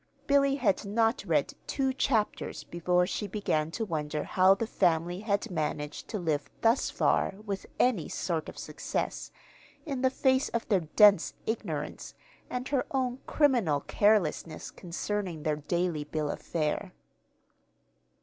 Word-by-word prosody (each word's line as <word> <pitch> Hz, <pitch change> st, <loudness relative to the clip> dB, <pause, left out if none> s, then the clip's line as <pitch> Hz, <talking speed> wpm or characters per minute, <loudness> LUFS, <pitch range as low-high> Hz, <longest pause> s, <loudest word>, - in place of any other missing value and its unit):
Billy 275 Hz, -1 st, +4 dB
had 220 Hz, -9 st, +1 dB
not 225 Hz, +3 st, +1 dB
read -, -, +1 dB
two 265 Hz, -1 st, 0 dB
chapters 230 Hz, -5 st, 0 dB
before 180 Hz, +1 st, +1 dB
she 205 Hz, +3 st, -3 dB
began 160 Hz, -6 st, -1 dB
to 225 Hz, +7 st, -3 dB
wonder 150 Hz, -4 st, -2 dB
how 185 Hz, +1 st, +4 dB
the 230 Hz, -, -2 dB
family 175 Hz, -3 st, +1 dB
had 205 Hz, +1 st, -1 dB
managed 150 Hz, -2 st, -3 dB
to 215 Hz, -, -3 dB
live 150 Hz, -6 st, -1 dB
thus 230 Hz, +3 st, +3 dB
far -, -, +1 dB
with 195 Hz, -2 st, -4 dB
any 230 Hz, -10 st, +2 dB
sort 165 Hz, -4 st, -2 dB
of -, -, -11 dB
success, -, -, -4 dB, 0.5 s
in 275 Hz, -5 st, -3 dB
the 260 Hz, -, +4 dB
face 260 Hz, 0 st, +2 dB
of 235 Hz, -, -2 dB
their 185 Hz, -7 st, +2 dB
dense 205 Hz, -4 st, +6 dB
ignorance 220 Hz, -, -4 dB, 0.3 s
and 250 Hz, +1 st, -4 dB
her 270 Hz, -2 st, 0 dB
own 255 Hz, -2 st, -1 dB
criminal 235 Hz, -, +3 dB
carelessness 180 Hz, -6 st, +1 dB
concerning 180 Hz, -2 st, -4 dB
their 155 Hz, -1 st, 0 dB
daily 165 Hz, +1 st, -1 dB
bill 150 Hz, -1 st, -2 dB
of -, -, -7 dB
fare. 170 Hz, +4 st, -2 dB
195 Hz, 140 wpm, -29 LUFS, 160-235 Hz, 0.5 s, dense